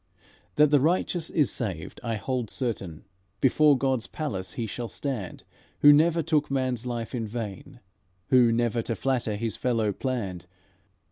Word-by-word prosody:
"That 150 -1 +5
the 145 - +6
righteous 170 +2 0
is 150 -5 +2
saved 95 -9 -5
I 115 -1 -1
hold 120 +2 -3
certain; 100 - -4 0.3
Before 145 +2 +4
God's 130 -3 0
palace 100 -12 -4
he 115 - -3
shall 120 +3 -5
stand 120 -8 -5 0.4
Who 145 0 +9
never 165 +2 +3
took 150 -2 +1
man's 130 -3 -1
life 120 -2 -4
in 115 -3 -2
vain, 115 +3 -7 0.5
Who 125 -3 +5
never 120 0 +1
to 115 0 -3
flatter 125 -5 -1
his 115 +1 -2
fellow 115 -5 0
planned. 100 -10 -4
120 Hz, 150 wpm, -26 LUFS, 110-140 Hz, 0.5 s, Who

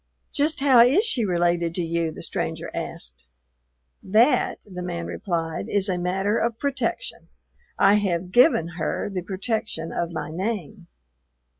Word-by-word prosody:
"Just 300 +1 0
how 270 -4 +6
is 270 - +6
she 265 - +1
related 175 -2 +1
to 180 - -1
you?" 165 -1 -1
the - - -9
stranger - - -3
asked. 60 0 -5 0.8
"That," 220 +8 +3
the 180 -3 -7
man 170 -1 -4
replied, 165 -4 -3
"is 200 -1 +2
a 180 -1 0
matter 190 +4 0
of 230 -1 -1
protection. 280 +2 -3 0.5
I 195 +1 +5
have 180 -3 -1
given 245 - +5
her 160 +5 -2
the 185 - -2
protection 190 -3 -3
of 170 - -2
my 160 - -4
name." 190 0 -4
185 Hz, 145 wpm, -24 LUFS, 170-225 Hz, 0.8 s, how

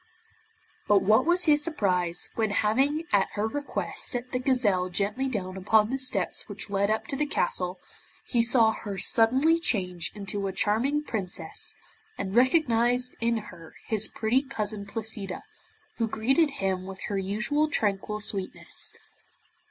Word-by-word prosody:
But 205 -2 +4
what 220 +8 +4
was 350 +1 +3
his 300 -2 +4
surprise, 180 - -1
when 220 -1 0
having 265 +10 +1
at 195 -1 +3
her 205 - -1
request 285 +5 -3
set 245 0 -3
the 250 - -1
gazelle 220 -9 +1
gently 210 +8 -1
down 190 -7 -3
upon 210 +4 +3
the 270 - -1
steps 225 -9 0
which 205 0 -7
led 200 0 +1
up 220 0 0
to - - -4
the 295 +2 0
castle, 180 -10 0 0.5
he 240 - +2
saw 230 -1 +4
her 205 -2 -6
suddenly 260 +12 +3
change 180 - -1
into 200 -1 -3
a 190 - -4
charming 250 +10 +1
Princess, 185 - -4 0.4
and 190 - -4
recognized 245 -1 +3
in 230 0 +2 0.2
her 165 -1 -13
his 220 -1 +2
pretty 230 +4 +1
cousin 215 -6 -4
Placida, 205 -3 -3 0.5
who 230 - 0
greeted 270 +9 +2
him 190 -1 -1
with 190 0 -8
her 200 -2 -2
usual 215 +11 0
tranquil 210 -3 -1
sweetness. 200 -2 -2
220 Hz, 150 wpm, -27 LUFS, 195-255 Hz, 0.5 s, But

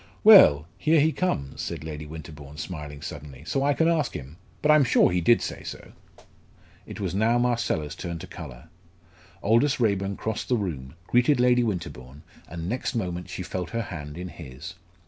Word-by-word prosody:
"Well! 80 - +8
here 160 +1 +4
he 155 +2 +4
comes," 70 - -2
said - - -5
Lady 75 -1 -6
Winterbourne, 75 -2 -10
smiling 75 -3 -7
suddenly; 70 -3 -8
"so 135 - -1
I 145 0 +2
can 165 - +2
ask 165 -3 +1
him. 70 +5 -8 0.3
But 155 - +5
I - - +7
am 150 - +5
sure 125 -6 +4
he 90 0 +1
did 115 +7 +4
say - - -5
so." - - -8 1.0
It - - -8
was - - -2
now 110 +4 +2
Marcella's 120 -11 0
turn 85 -2 -5
to - - -8
colour. 60 +6 -10 0.7
Aldous 115 +7 +3
Raeburn 100 -4 0
crossed 110 -1 -4
the 125 - +3
room, 75 - -5
greeted 125 +5 +3
Lady 125 0 +4
Winterbourne, 85 - -4 0.3
and 85 0 -5
next 125 +4 -2
moment 90 -5 -3
she 90 - -5
felt 90 -1 -4
her 115 0 -2
hand 75 -1 -7
in 90 +1 -6
his. 75 +2 -9
90 Hz, 185 wpm, -26 LUFS, 75-120 Hz, 1.0 s, Well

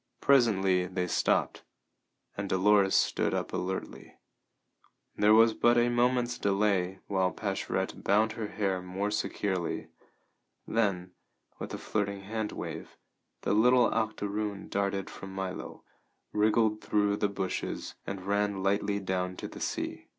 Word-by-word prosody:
Presently 95 -9 +3
they 90 0 -2
stopped, 90 - +1 0.7
and 100 -1 -4
Dolores 95 +1 +4
stood - - +2
up - - -3
alertly. 95 +1 -4 1.0
There 105 +1 +5
was 115 0 +6
but 120 +2 +3
a 120 0 +4
moment's 120 0 +1
delay, 95 -2 +1
while 95 -2 +1
Pascherette 95 -2 -3
bound 110 +3 +3
her 110 -1 -4
hair 95 -3 -1
more 95 +3 -3
securely; 95 -4 -2 0.8
then, 95 -5 0 0.5
with - - -6
a - - -5
flirting 100 -2 -2
hand 110 +2 -3
wave, - - -7 0.4
the - - 0
little 125 +3 +4
octoroon 105 -2 -2
darted 100 -1 -1
from 95 0 -9
Milo, 95 -1 -5 0.5
wriggled 110 0 +2
through 105 -1 +1
the 105 - +1
bushes, 95 -2 -4
and 95 -1 -5
ran 100 -1 0
lightly 100 +1 +1
down 90 -1 -2
to - - -5
the - - -10
sea. - - -3
100 Hz, 130 wpm, -29 LUFS, 95-110 Hz, 1.0 s, was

